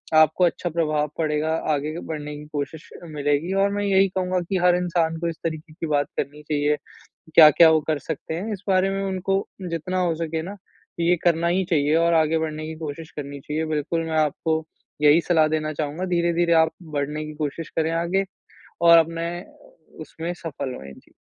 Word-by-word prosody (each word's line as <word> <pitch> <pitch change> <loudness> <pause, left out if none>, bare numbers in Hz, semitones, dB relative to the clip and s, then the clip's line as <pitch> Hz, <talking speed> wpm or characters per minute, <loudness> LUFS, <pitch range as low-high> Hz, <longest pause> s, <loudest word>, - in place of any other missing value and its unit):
आपको 155 +3 +5
अच्छा 175 +1 -1
प्रभाव 155 -2 0
पड़ेगा 155 0 0 0.2
आगे 155 +4 -3
बढ़ने 150 -1 -5
की 150 - -10
कोशिश 150 +2 -5
मिलेगी 150 +2 -1
और 200 - +3
मैं 205 0 -1
यही 195 0 +4
कहूँगा 185 0 -1
कि 190 - +1
हर 180 -1 +5
इंसान 170 -2 0
को 170 - -2
इस 165 - -5
तरीके 160 -1 -5
की 165 - -5
बात 145 -1 +1
करनी 150 +2 -3
चाहिए 150 0 +1 0.6
क्या-क्या 160 +1 +9
वो 160 - +4
कर 155 -2 +1
सकते 160 0 -5
हैं। 205 +6 -4
इस 200 -1 -8
बारे 190 0 +3
में 195 0 -2
उनको 195 0 -1 0.2
जितना 175 +3 -2
हो 175 -2 +1
सके 160 0 -3
ना 200 +3 -7 0.4
ये 170 +1 +3
करना 170 -1 +2
ही 185 +2 +2
चाहिए 150 -1 +2
और 170 +1 +3
आगे 160 0 +3
बढ़ने 155 -1 -3
की 160 - -6
कोशिश 160 +1 -7
करनी 140 -1 -6
चाहिए। 155 +3 -3
बिल्कुल 155 +2 -1
मैं 160 -1 -1
आपको 160 +1 0 0.4
यही 150 +3 +6
सलाह 160 -3 +5
देना 155 0 -1
चाहूँगा 155 +5 -3
धीरे-धीरे 170 0 +2
आप 160 - -6 0.3
बढ़ने 150 +2 -2
की 155 - -7
कोशिश 150 +3 -4
करे 160 0 +1
आगे 190 +3 0 0.6
और 170 - +10
अपने 165 +1 +1 0.7
उसमें 165 +2 -5
सफ़ल 140 -6 -6
हुए। 70 0 -10
जी। - - -19
160 Hz, 190 wpm, -23 LUFS, 150-170 Hz, 0.7 s, और